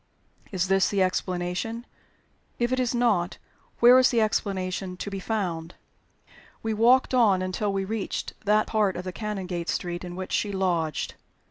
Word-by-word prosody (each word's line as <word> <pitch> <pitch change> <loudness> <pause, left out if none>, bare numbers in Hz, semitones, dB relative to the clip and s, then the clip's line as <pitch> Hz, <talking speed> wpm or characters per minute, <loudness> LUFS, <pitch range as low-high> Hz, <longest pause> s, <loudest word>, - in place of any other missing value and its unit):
Is 190 -2 0
this 195 -1 +3
the 200 -2 +2
explanation? 185 +5 -2 0.7
If 240 +1 0
it 255 - +1
is 250 -1 0
not, 210 -7 +1 0.4
where 245 +2 +8
is 255 - +5
the 235 - +2
explanation 190 -3 -1
to 200 - -5
be 195 - -4
found? 180 -6 -3 0.9
We 225 0 -1
walked 245 +5 +4
on 205 -7 +4
until 185 +3 -1
we 195 0 -1
reached 215 0 -3
that 210 +1 +3
part 210 -4 +1
of 180 - -4
the 185 -1 -5
Canongate 185 -5 -4
street 175 0 -2
in 175 -1 -7
which 185 0 -6
she 205 - 0
lodged. 175 -6 -1
195 Hz, 160 wpm, -26 LUFS, 180-220 Hz, 0.9 s, where